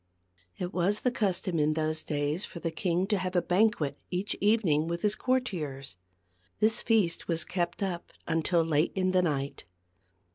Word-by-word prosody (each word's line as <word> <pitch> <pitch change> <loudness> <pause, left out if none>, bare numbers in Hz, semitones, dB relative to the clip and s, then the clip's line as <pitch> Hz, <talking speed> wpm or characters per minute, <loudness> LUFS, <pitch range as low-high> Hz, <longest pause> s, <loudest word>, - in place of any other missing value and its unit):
It 180 0 -4
was 190 +4 +1
the 250 - +2
custom 185 -6 0
in 150 +1 +2
those 155 0 -1
days 150 +4 -1
for 170 - -7
the 165 -1 -2
king 180 +1 0
to 205 0 +1
have 185 0 -3
a - - +6
banquet 180 -7 +2
each 185 +3 -2
evening 195 -8 +3
with 170 0 -3
his 210 0 +3
cour 260 0 +2
tiers. 150 - -5 0.6
This 220 +1 +2
feast 210 -7 +2
was 165 -2 +1
kept 175 +2 -2
up 175 -3 -3 0.2
until 165 +1 +2
late 155 0 +1
in 185 -1 +1
the 185 0 +4
night. 140 -5 -2
175 Hz, 175 wpm, -29 LUFS, 155-195 Hz, 0.6 s, a